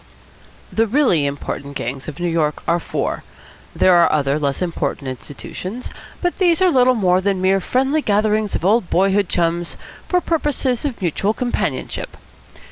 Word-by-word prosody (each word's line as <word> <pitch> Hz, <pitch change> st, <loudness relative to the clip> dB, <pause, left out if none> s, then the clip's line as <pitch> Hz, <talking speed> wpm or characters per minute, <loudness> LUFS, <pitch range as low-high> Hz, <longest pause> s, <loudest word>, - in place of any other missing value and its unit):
The 225 Hz, +1 st, +2 dB
really 210 Hz, -, +3 dB
important 140 Hz, 0 st, -5 dB
gangs 130 Hz, +3 st, -5 dB
of 155 Hz, 0 st, -7 dB
New 175 Hz, -, -1 dB
York 160 Hz, -3 st, 0 dB
are 170 Hz, +1 st, +2 dB
four. -, -, -3 dB, 0.5 s
There 185 Hz, -, +5 dB
are 170 Hz, -1 st, +5 dB
other 140 Hz, 0 st, +1 dB
less 140 Hz, -2 st, -1 dB
important 170 Hz, -5 st, -2 dB
institutions, 180 Hz, -, -7 dB, 0.3 s
but 355 Hz, -, 0 dB
these 345 Hz, -4 st, +3 dB
are 370 Hz, -1 st, +4 dB
little 255 Hz, -2 st, +4 dB
more 185 Hz, -4 st, +2 dB
than 195 Hz, -1 st, 0 dB
mere 190 Hz, +1 st, +3 dB
friendly 265 Hz, +9 st, +1 dB
gatherings 215 Hz, -2 st, +1 dB
of -, -, -3 dB
old 205 Hz, -1 st, +3 dB
boyhood 195 Hz, +1 st, +2 dB
chums 170 Hz, 0 st, 0 dB, 0.3 s
for 360 Hz, -, +2 dB
purposes 295 Hz, -7 st, 0 dB
of 245 Hz, -8 st, -4 dB
mutual 195 Hz, +5 st, 0 dB
companionship. 245 Hz, -1 st, -3 dB
195 Hz, 155 wpm, -20 LUFS, 165-250 Hz, 0.5 s, There